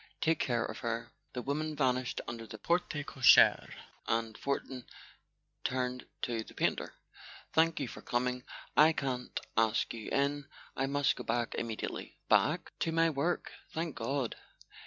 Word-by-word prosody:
Take 160 0 +2
care 120 -2 +1
of - - -6
her." 115 -1 -3 0.2
The 125 - -4
women 155 +3 -2
vanished 130 -3 +1
under 115 -1 -6
the 110 - -8
porte 170 +10 +1 0.2
cochere, 130 -4 +6 0.4
and 115 -1 0
Fortin 135 -2 -3 0.8
turned 125 0 -1 0.2
to 115 -2 -1
the - - -15
painter. - - 0 0.6
"Thank 165 +1 +4
you 140 - -1
for - - -9
coming. 125 +1 -1 0.3
I 155 +2 +7
can't 130 -4 -2 0.2
ask 110 0 +2
you 115 -2 -6
in—I 140 -1 -2
must 145 0 +2
go - - -5
back 120 +1 -1
immediately." 115 -2 -4
"Back?" - - +3
"To 165 - 0
my 165 0 +3
work. 160 +5 -1 0.2
Thank 165 -1 -1
God. 125 +1 -1
130 Hz, 145 wpm, -32 LUFS, 120-145 Hz, 0.8 s, I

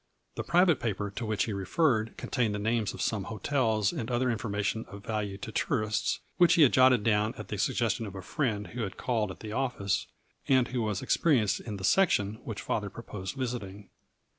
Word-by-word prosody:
The - - -4
private 175 -3 +4
paper 105 -3 -2
to 115 +4 -5
which 110 -2 +1
he 110 - -3
re 100 -1 -3
ferred 115 - +1
contained 115 -5 -1
the - - -2
names 110 0 0
of - - -3
some 105 -4 -1
hotels 110 -1 0
and 125 -8 -4
other 125 +1 +1
information 110 -1 -2
of 100 0 -11
value 105 -3 -2
to 110 - -7
tourists, 110 -2 0 0.2
which 175 -1 +6
he 165 - +7
had 135 - +5
jotted 130 -4 +5
down 105 0 +2
at - - -8
the 105 - -3
suggestion 115 +1 0
of 100 - -9
a 95 - -7
friend 110 -6 -1
who 120 +5 -5
had 100 -3 -4
called 115 -5 0
at 95 - -9
the 110 - -6
office, 120 -5 -1 0.4
and 130 -2 +4
who 125 -1 -1
was 105 -3 -2
ex - - +2
perienced 115 - +2
in 105 -3 -6
the 95 - -8
section 110 - +3
which - - -5
father - - -1
proposed 95 +7 -7
visiting. 105 -7 -5
110 Hz, 210 wpm, -29 LUFS, 105-125 Hz, 0.4 s, he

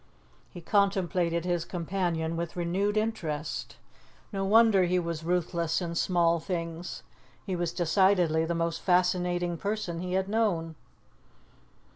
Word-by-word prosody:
He 175 - -10
contemplated 180 -3 +1
his 175 -2 0
companion 170 -2 -2
with 170 0 -4
renewed 190 +4 0
interest; 165 -9 -3 0.6
no 195 -1 -1
wonder 210 -2 +5
he 180 +1 +1
was 170 -2 -3
ruthless 170 -1 0
in 170 -2 -4
small 170 -1 +2
things. 170 0 -5 0.4
He 190 - -2
was 175 -1 -1
decidedly 175 -2 +3
the 170 +1 -2
most 165 0 -1
fascinating 180 -1 +1
person 200 -3 -3
he 180 +1 -4
had 190 0 +1
known. 200 -7 0
175 Hz, 125 wpm, -28 LUFS, 170-190 Hz, 0.6 s, wonder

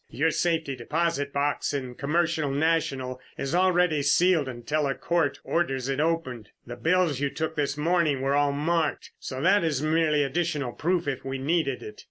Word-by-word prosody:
"Your 160 +4 +1
safety 160 -4 0
deposit 145 +2 -1
box 145 +1 -1
in 130 -2 -3
the - - -10
Commercial 160 +2 0
National 135 -4 0 0.2
is 140 - -3
already 180 -4 +3
sealed 160 +2 +3
until 135 +5 -2
a 135 - -1
court 150 -5 0
orders 135 -6 -1
it 135 +1 -1
opened. 150 -9 -1 0.2
The 120 - -7
bills 165 +2 +1
you 145 0 0
took 160 +2 -3
this 145 -1 -1
morning 155 -3 +1
were 135 +1 +1
all 145 0 +3
marked, 155 +2 -1
so 130 - -6
that 195 +1 +4
is 150 -4 0
merely 155 -1 +2
additional 145 -2 -1
proof, 175 +4 -1
if 135 -3 -3
we 135 0 -4
needed 140 -1 -1
it. 105 0 -10
150 Hz, 180 wpm, -26 LUFS, 135-165 Hz, 0.2 s, that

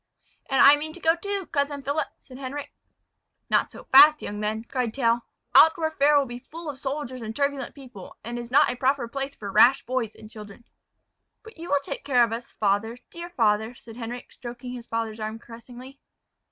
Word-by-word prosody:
"And 270 - +4
I 285 +1 +8
mean 310 +1 -5
to 355 - -11
go 325 -1 +3
too, 400 +2 -3
cousin 280 -1 -1
Philip," 285 +2 -1
said 255 -2 -14
Henric. 275 +2 -6 0.8
"Not - - +2
so - - -11
fast, 300 +3 +7
young 205 0 -5
men," 215 +1 -2
cried 240 -2 -3
Tell. 235 -3 +1 0.3
"Altdorf 320 0 +5
fair 290 +1 +5
will 280 - +3
be 240 -1 -8
full 315 +4 -8
of 265 - -14
soldiers 270 -2 -4
and 220 0 -6
turbulent 280 -2 -2
people, 250 -9 -12
and 240 +1 -5
is 240 -1 -7
not 260 0 +4
a - - -5
proper 260 -1 0
place 275 +3 -5
for 200 -2 -7
rash 265 +7 +5
boys 245 -4 -2
and 215 - -13
children." 210 +1 -12 0.8
"But 445 -6 -14
you 340 - -7
will 285 -1 +2
take - - -6
care 255 -4 +4
of 230 -1 0
us, 235 +1 -6
father, 210 +3 0
dear 340 +1 -8
father," 220 -5 +1
said 230 -1 -13
Henric, 240 +1 -7
stroking 245 0 -8
his 245 -2 -8
father's 225 -1 -3
arm 215 +1 -4
caressingly. 245 +4 -13
255 Hz, 200 wpm, -25 LUFS, 230-285 Hz, 0.8 s, I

